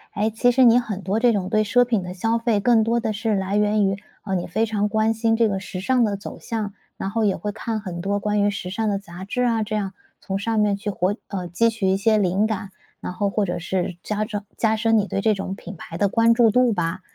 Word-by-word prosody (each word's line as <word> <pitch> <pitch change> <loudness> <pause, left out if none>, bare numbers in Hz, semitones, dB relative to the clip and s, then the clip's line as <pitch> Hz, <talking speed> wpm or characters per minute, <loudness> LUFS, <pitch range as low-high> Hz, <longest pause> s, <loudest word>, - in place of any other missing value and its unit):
诶， 215 +2 +1
其 245 +3 +3
实 260 +1 +4
你 240 0 +7
很 210 -5 -5
多 195 +5 0
这 240 0 +4
种 200 -4 -1
对 215 +2 +2
奢 245 +4 +3
品 230 -5 0
的 180 0 -6
消 225 +5 0
费 230 -3 +1
更 225 +1 +4
多 230 +2 +1
的 225 -2 -2
是 220 +1 -1
来 195 0 -1
源 210 0 +3
于， 195 0 -1 0.3
呃， 195 - -3
你 180 -2 -1
非 220 +6 0
常 210 -1 -1
关 220 +1 +2
心 225 0 +1
这 230 0 +3
个 195 -2 -1
时 190 -1 -7
尚 250 +5 +2
的 205 -3 0
走 200 - -9
向， 220 -4 -4 0.2
然 195 - -3
后 225 +1 0
也 200 -3 +2
会 205 +5 -3
看 225 +1 -3
很 180 -4 -6
多 200 +2 0
关 210 0 0
于 205 - +3
时 190 -3 -5
尚 220 +2 -1
的 200 - 0
杂 185 -1 -9
志 250 +5 -1
啊， 230 -2 +2
这 215 0 -2
样， 200 -2 -2 0.3
从 195 0 -3
上 225 +2 0
面 210 -1 +2
去 205 +2 -4
活 195 0 0
呃， 185 -3 -4
汲 230 +7 +2
取 225 -3 -3
一 190 - +3
些 215 +2 +3
灵 195 +1 +2
感。 215 -2 -4 0.3
然 - - -5
后 200 +2 0
或 205 +1 0
者 175 - -3
是 180 +1 -2
加 210 0 -2
装 210 -2 -5
加 220 -1 +2
深 225 +1 +2
你 205 - +2
对 195 - -2
这 215 0 +3
种 190 -1 -4
品 190 0 -9
牌 165 +1 -8
的 200 - +3
关 230 +2 +4
注 230 -1 +5
度 250 +1 +3
吧。 170 -1 -2
210 Hz, 290 characters per minute, -23 LUFS, 195-225 Hz, 0.3 s, 你